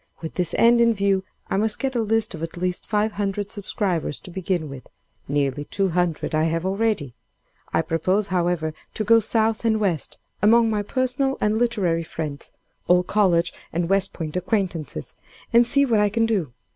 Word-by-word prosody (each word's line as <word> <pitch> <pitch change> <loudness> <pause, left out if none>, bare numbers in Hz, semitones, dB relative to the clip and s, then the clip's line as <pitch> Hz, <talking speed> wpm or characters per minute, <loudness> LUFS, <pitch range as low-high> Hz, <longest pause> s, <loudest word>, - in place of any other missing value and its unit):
With 160 - -6
this 180 -2 -1
end 235 +1 +5
in 230 -1 +4
view, 200 -1 +1 0.2
I - - -1
must 215 +1 +1
get 270 -1 -2
a 240 - +1
list 225 0 +1
of 160 - -7
at 165 +1 -5
least 180 0 -2
five 215 0 +1
hundred 205 0 -2
subscribers 195 -7 -2
to 180 - -10
begin 180 -3 -2
with; 140 -2 -10 0.4
nearly 145 0 -1
two 195 +4 0
hundred 175 -3 -1
I 155 +1 +2
have 165 +2 -1
already. 195 - 0 0.6
I 160 - +1
propose, 185 +6 +1
however, 175 -3 0 0.2
to 215 - -1
go 230 +2 +6
South 220 0 +1
and 220 -1 +2
West, 180 -8 -1 0.2
among 225 +1 +5
my 210 -1 0
personal 260 +4 0
and 210 0 +1
literary 210 -8 +1
friends—old 165 +3 -2
college 180 -5 +2 0.2
and 170 +1 -1
West 195 0 +2
Point 160 -2 -6
acquaintances—and 185 - -1
see 280 +3 +4
what 230 -5 +2
I 210 0 +3
can 225 +2 +1
do. 195 - -1
195 Hz, 175 wpm, -23 LUFS, 165-220 Hz, 0.6 s, go